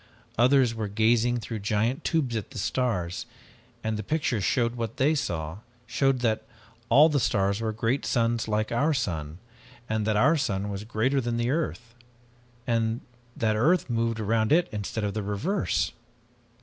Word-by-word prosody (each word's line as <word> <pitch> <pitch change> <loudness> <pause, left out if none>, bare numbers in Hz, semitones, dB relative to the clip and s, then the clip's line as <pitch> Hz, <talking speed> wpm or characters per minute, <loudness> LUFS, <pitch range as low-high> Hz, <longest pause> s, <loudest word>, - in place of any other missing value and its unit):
Others 125 0 +4
were 110 -2 -3
gazing 115 +3 +2
through 110 0 -5
giant 110 +5 0
tubes 140 -8 0
at 110 -4 -3
the - - -10
stars, 105 -2 -1 0.6
and 110 -1 -1
the - - -3
pictures 120 -3 -1
showed 120 +1 +1
what 115 -2 -4
they 145 +4 +3
saw, 85 - -3 0.3
showed 130 +2 +1
that 110 -2 +1 0.5
all 140 +6 +7
of 160 - +3
the 145 - +2
stars 100 -3 +1
were 110 -1 -1
great 115 +5 -1
suns 115 -2 0
like 110 0 0
our 145 +6 +2
sun, 80 - -3 0.5
and 110 -1 -1
that 110 -1 +2
our 155 +9 +4
sun 100 -7 -1
was 100 +1 -5
greater 125 +5 +1
than 120 -1 -2
earth, 125 -5 -2 0.7
that 115 -1 -2
earth 150 +5 +2
moved 115 -1 0
around 110 +2 +1
it 175 +3 +4
instead 105 +1 -3
of 100 -1 -1
the 110 - -2
reverse! 105 - -1
115 Hz, 160 wpm, -27 LUFS, 105-125 Hz, 0.7 s, all